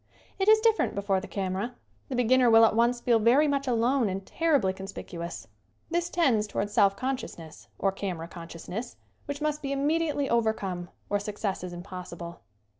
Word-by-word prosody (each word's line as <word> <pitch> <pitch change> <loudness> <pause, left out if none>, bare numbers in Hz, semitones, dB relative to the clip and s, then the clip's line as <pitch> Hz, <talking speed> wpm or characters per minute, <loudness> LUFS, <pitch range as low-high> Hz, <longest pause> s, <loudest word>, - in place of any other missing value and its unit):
It 385 - +1
is 435 0 +7
different 445 -1 +2
before 200 -1 0
the 205 - -8
camera. 195 +5 -3 0.3
The 260 - -2
be 245 - +2
ginner 255 +1 +4
will 225 0 +8
at 220 - +2
once 240 +1 +3
feel 240 -1 +3
very 250 +8 +5
much 280 -1 0
alone 240 0 +2
and 190 +1 -4
terribly 290 -13 +1
conspicuous. 180 -3 -7 0.4
This 345 0 0
tends 250 -13 +2
toward 205 0 -2
self 200 -3 +4
consciousness, 255 -12 -5
or 195 - +1
camera 185 -4 -4
consciousness, 175 +7 -7 0.3
which 285 +1 -5
must 300 0 -1
be 275 -1 -3
immediately 290 +1 +1
overcome 205 -7 0 0.2
or 205 - 0
success 205 -2 -3
is 180 - -5
impossible. 175 -1 -8
225 Hz, 170 wpm, -28 LUFS, 190-275 Hz, 0.4 s, will